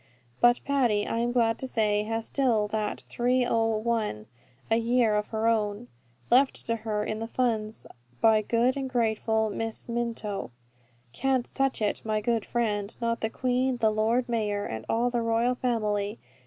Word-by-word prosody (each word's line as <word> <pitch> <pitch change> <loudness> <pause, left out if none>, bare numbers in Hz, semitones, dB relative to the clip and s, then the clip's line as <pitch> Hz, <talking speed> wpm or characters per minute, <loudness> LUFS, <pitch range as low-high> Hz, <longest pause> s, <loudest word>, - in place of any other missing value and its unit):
But 240 0 +5
Patty, 245 -7 +2
I 230 - -2
am 240 +1 0
glad 230 -2 +2
to 265 - -4
say, 210 -4 +1
has 225 +1 -2
still 235 -7 +1
that 215 -1 -2
30*l.* 225 - 0 0.5
a - - +5
year 230 -1 +2
of 210 0 0
her 220 0 -2
own, 220 0 0 0.4
left 265 +2 +3
to 230 0 0
her 215 -1 -2
in 215 +1 -3
the 225 - -4
funds 225 -3 -1 0.3
by 220 -1 +5
good 235 +4 +1
and 270 -1 -3
grateful 220 -2 +1
Miss 225 +1 -4
Minto. 230 - -3 0.6
"Can't 265 -2 0
touch 270 -4 0
it, 210 - 0
my 215 -1 0
good 225 0 0
friend, 210 -4 0
not 230 0 -1
the 220 - 0
Queen, 255 +2 0
the 220 -2 +2
Lord 225 +3 +1
Mayor, 210 -4 -1
and 110 0 -5
all 240 +2 +1
the 240 -1 0
royal 230 +2 +1
family. 215 -4 -1
225 Hz, 165 wpm, -27 LUFS, 215-240 Hz, 0.6 s, But